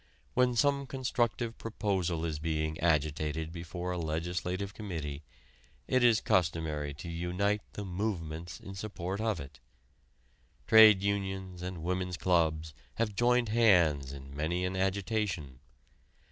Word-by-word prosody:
When 125 -1 +3
some 140 +2 +2
constructive 120 -3 -1
proposal 95 -7 -1
is 75 -2 -3
being 80 0 -2
agitated 80 0 0
before 85 +1 -5
a 90 - -2
legislative 90 +4 -2
committee, 80 -9 -5 0.7
it 130 -1 +3
is 115 -2 +5
customary 80 -4 0
to 80 - -8
unite 90 +5 -1
the 105 - -5
"movements" 85 -4 -4
in 95 - -9
support 95 -1 -4
of 110 -5 0
it. 70 -1 -10 1.1
Trade 110 -3 +8
unions 95 -2 -2
and 90 -2 -5
women's 90 0 -2
clubs 80 -4 +1 0.2
have 110 -3 -1
joined 120 +1 +3
hands 85 - +4
in 70 0 -9
many 85 +5 -1
an 90 +1 -2
agitation. 95 - -1
90 Hz, 125 wpm, -31 LUFS, 80-105 Hz, 1.1 s, Trade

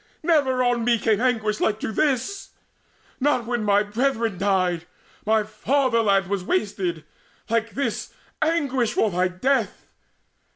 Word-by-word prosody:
Never 285 -6 +2
on 245 -1 +1
me 235 0 +3
came 220 -1 +1
anguish 220 -4 0
like 215 0 0
to - - -2
this 280 - -1 0.7
Not 260 -4 +1
when 240 -2 -2
my 205 0 +3
brethren 225 -2 -1
died, 185 -3 0 0.4
my 220 0 +3
fatherland 220 -2 +1
Was 195 0 -2
wasted 185 -4 -2 0.5
like 230 0 0
this 280 - -2 0.3
anguish 280 -7 +1
for 215 - +1
thy 180 +1 +1
death! 230 +6 -1
225 Hz, 130 wpm, -23 LUFS, 200-255 Hz, 0.7 s, me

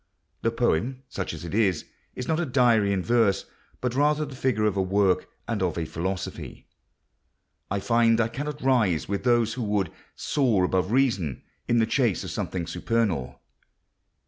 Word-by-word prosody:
The 115 - +2
poem, 120 +2 0
such 95 -6 -4
as 80 +1 -7
it 85 - -6
is, 100 -6 +1 0.3
is 125 - -5
not 160 0 +1
a 175 - 0
diary 120 -6 +3
in 95 -2 0
verse, 115 -4 +2 0.4
but 125 -1 -1
rather 150 +3 +2
the 140 -2 -9
figure 125 -5 +1
of 105 -2 +1
a 95 - +1
work 95 0 +1 0.2
and - - -2
of - - 0
a 85 - -1
philosophy.... 90 +4 -5 1.0
I 100 - -1
find 115 +1 +3
I 115 - +3
cannot 145 +4 -5
rise 115 -11 +2
with 100 0 -2
those 120 -3 +3
who 125 - -5
would 105 -5 0 0.2
soar 120 -10 +1
above 90 +1 +1
reason 115 - +1 0.2
in 120 - +2
the 115 - +4
chase 115 - +1
of - - -6
something 90 -3 -3
supernal. 85 - -1
110 Hz, 170 wpm, -26 LUFS, 95-125 Hz, 1.0 s, the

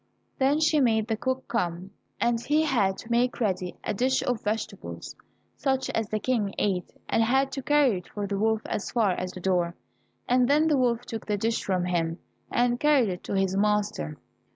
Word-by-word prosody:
Then 275 +3 +3
she 310 -1 +3
made 220 -5 +2
the 225 - 0
cook 260 +3 -2
come, 180 -4 -2 0.3
and 235 -1 +1
he 305 +2 +2
had 210 -11 +1
to 225 - -9
make 245 +2 +1
ready 185 -5 -1
a - - -1
dish 255 +5 +1
of 245 -4 -1
vegetables, 215 +2 -4 0.4
such 265 -1 0
as 220 -2 -1
the 215 - 0
King 215 -3 -1
ate, 185 -4 -1 0.2
and - - +2
had 265 +4 +2
to 270 - -4
carry 275 -8 +3
it 180 - -16
for 205 -1 -4
the 200 0 -2
wolf 220 +1 +2
as 210 - -3
far 220 -5 +2
as 180 0 -3
the - - -8
door, 180 -2 0 0.5
and 250 0 +3
then 300 +3 +4
the 295 - +3
wolf 245 -2 +1
took 225 -1 -6
the 210 -1 0
dish 225 +3 -1
from 185 -2 0
him, 165 -2 -1 0.3
and 240 0 +1
carried 290 -7 +4
it 180 -1 -5
to - - -4
his 195 -1 +1
master. 200 - 0
225 Hz, 200 wpm, -27 LUFS, 195-255 Hz, 0.5 s, then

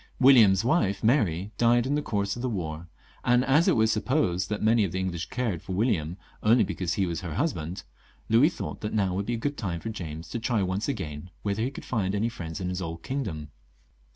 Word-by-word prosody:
William's 115 -7 +6
wife 100 - +1
Mary 105 - +2
died 120 0 +4
in 135 - 0
the 150 - +1
course 100 -6 -1
of 120 - -6
the 130 - -1
war, 85 -5 -4 0.4
and 125 +1 +3
as 150 +5 +4
it - - +4
was 110 -1 +3
sup 110 0 -1
posed 100 - +1
that 105 - -2
many 110 0 +4
of 95 - -1
the 95 - -1
English 90 0 -3
cared 120 -9 -2
for 95 - -6
William 90 -6 0 0.2
only 115 +3 +5
because 90 -2 -2
he 95 - +1
was 85 -2 -3
her 85 -4 -5
husband, 90 - -2 0.4
Louis 120 +8 +5
thought - - -6
that 105 0 -3
now 95 -4 +1
would 100 +2 -2
be 120 - 0
a - - -3
good 145 +5 -2
time 90 -6 -3
for 115 - -5
James 80 -6 -6
to 120 - -3
try 115 -3 0
once 95 +3 -1
again 75 - -5
whether 100 +1 -1
he 120 - 0
could 135 - -10
find 100 -4 -1
no 115 +3 +1
friends 80 -8 -6
in 90 -1 -2
his 90 0 -3
old 85 -1 -5
kingdom. 100 - -4
100 Hz, 235 wpm, -27 LUFS, 90-120 Hz, 0.4 s, William's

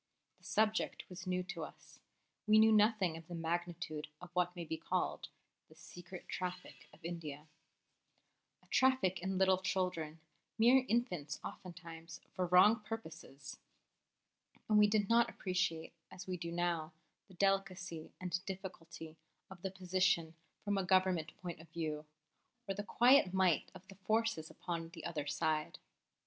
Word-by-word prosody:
The - - -21
subject 220 0 +1
was 185 +1 -8
new 180 0 0
to 195 - -5
us; - - -12 0.5
we 215 0 +7
knew 220 +1 +7
nothing 210 -6 +4
of 165 0 -12
the 175 - -6
magnitude 165 -2 -3
of 180 0 -11
what 180 0 +1
may 170 -1 -5
be 160 - -3
called - - -2 0.4
"The 155 - -17
Secret 175 +3 -11
Traffic 180 0 -5
of 165 - -16
India" 155 -4 -5 1.2
a - - -23
traffic 260 -9 +3
in 190 +1 -1
little 190 -1 +4
children, 180 -5 -1 0.4
mere 250 +4 +6
infants 180 - 0
oftentimes, 170 -3 -8
for 185 -2 -1
wrong 185 +6 +7
purposes; 160 -10 -8 1.1
and 215 -1 +5
we 210 - +7
did 205 -1 +2
not 235 +1 +4
appreciate, 180 -6 -1 0.2
as 185 - -9
we 185 - -3
do 170 -1 -5
now, 170 -2 -1 0.3
the 190 - -16
delicacy 185 -3 0
and 180 0 -2
difficulty 170 -4 -7 0.3
of 185 -2 -11
the 190 - -2
position 185 -3 +1 0.3
from 205 -1 +1
a - - 0
Government 185 -4 +2
point 175 -3 -6
of 165 - -16
view, 155 -2 -4 0.6
or 195 - 0
the 200 - -3
quiet 240 -2 +5
might 185 -5 +3
of 185 0 -12
the 195 - -11
forces 215 -3 0
upon 165 -2 -4
the 165 - -8
other 150 -3 -3
side. 155 +1 0
180 Hz, 150 wpm, -36 LUFS, 165-195 Hz, 1.2 s, we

